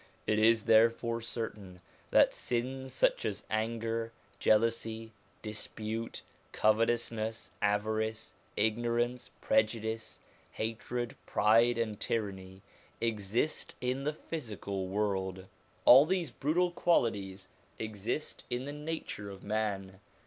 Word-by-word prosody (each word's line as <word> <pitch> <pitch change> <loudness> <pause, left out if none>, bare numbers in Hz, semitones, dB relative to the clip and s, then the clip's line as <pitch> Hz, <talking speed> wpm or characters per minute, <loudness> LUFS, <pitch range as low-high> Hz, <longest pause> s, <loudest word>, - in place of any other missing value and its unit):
It 110 0 +2
is 110 0 +5
therefore 115 +1 +4
certain 105 -5 -5 0.3
that - - +5
sins 130 +2 -2
such - - +2
as - - -2
anger, 115 +1 -1 0.3
jealousy, 115 0 +2 0.3
dispute, 110 +1 -5 0.3
covetousness, 115 0 +1
avarice, 110 +1 0 0.2
ignorance, 120 +3 0
prejudice, 115 - 0 0.3
hatred, 115 +2 -3
pride, 115 +2 +4
and 110 -3 -1
tyranny 95 -3 -3 0.4
exist 115 +5 -1
in 125 +2 -1
the 150 - +1
physical 105 - -5
world. 95 -2 -1 0.4
All 135 +5 +9
these 180 -3 0
brutal 175 +5 +1
qualities 100 - +1 0.3
exist 110 +6 -3
in 125 +2 -2
the 145 - -5
nature 150 -9 -5
of 95 -1 -10
man. 100 -3 -2
115 Hz, 100 wpm, -32 LUFS, 105-120 Hz, 0.4 s, All